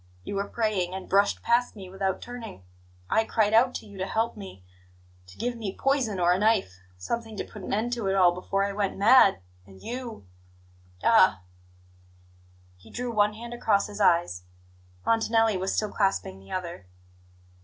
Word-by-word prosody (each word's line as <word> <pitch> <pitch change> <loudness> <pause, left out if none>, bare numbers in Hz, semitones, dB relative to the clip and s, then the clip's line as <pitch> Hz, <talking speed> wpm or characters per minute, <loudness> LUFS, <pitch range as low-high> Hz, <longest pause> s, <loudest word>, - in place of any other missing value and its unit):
You - - -6
were 200 +1 -2
praying, 200 -6 -1
and 190 - -7
brushed 200 +1 +2
past 240 +1 +1
me 195 -3 -9
without 190 0 -3
turning. 235 - -9 0.4
I 220 - +2
cried 220 -1 +1
out 250 +3 +4
to - - -6
you 205 -2 -12
to 190 - -2
help 225 +3 -1
me 190 - -11 0.6
to 90 - -15
give 245 0 -2
me 210 -4 -6
poison 265 -8 +1
or 175 0 +4
a 185 - 0
knife 205 - +1 0.2
something 220 - -4
to - - -2
put 210 - -11
an - - -6
end 225 +4 0
to 230 -5 -2
it 195 - +1
all 180 -2 +5
before 195 +2 -1
I 200 - -3
went 200 -1 -2
mad. 200 - +6 0.3
And 95 -1 -15
you 240 - -7 0.8
ah 95 0 +5 0.7
!" 90 0 -30
He - - -17
drew 245 0 -4
one 210 -1 +2
hand 235 +2 -8
across 215 -4 +1
his 210 0 -7
eyes. 170 - +2 0.6
Montanelli 225 -1 +2
was 190 +1 -2
still 215 -1 -1
clasping 195 - -1
the 95 - -16
other. 175 - -5
200 Hz, 180 wpm, -26 LUFS, 180-225 Hz, 0.8 s, mad